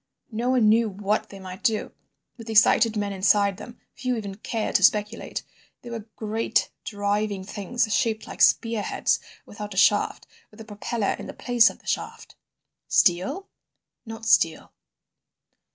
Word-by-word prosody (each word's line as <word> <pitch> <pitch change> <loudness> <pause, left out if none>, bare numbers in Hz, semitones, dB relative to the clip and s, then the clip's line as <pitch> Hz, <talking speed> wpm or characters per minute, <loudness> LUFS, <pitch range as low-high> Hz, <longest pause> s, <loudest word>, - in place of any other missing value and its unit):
No 235 +3 -2
one 250 -4 +3
knew 225 +1 +4
what 205 +2 -2
they 195 - -11
might 185 +1 -9
do, 225 -4 0 0.4
with 230 -2 -11
excited 220 +1 +4
men 205 -1 -2
inside 200 0 +2
them; 240 - -11
few 255 -2 -2
even 200 -3 -5
cared 220 +2 -4
to 190 - -4
speculate. 210 +3 +1 0.4
They 240 - -9
were 225 -2 -6
great 220 +1 -1
driving 205 -1 -2
things 210 +4 -2
shaped 220 0 0
like - - -8
spear 230 -2 +3
heads - - 0 0.3
without 210 -1 -8
a - - -8
shaft, 205 +1 +3 0.2
with 210 - -19
a 220 - -9
propeller 210 0 -2
in - - -7
the - - -7
place 245 -1 +4
of - - -11
the - - -27
shaft." - - -4 0.5
"Steel?" 190 - +2 0.6
"Not 225 -1 -9
steel." 165 -7 +2
215 Hz, 155 wpm, -25 LUFS, 200-230 Hz, 0.6 s, knew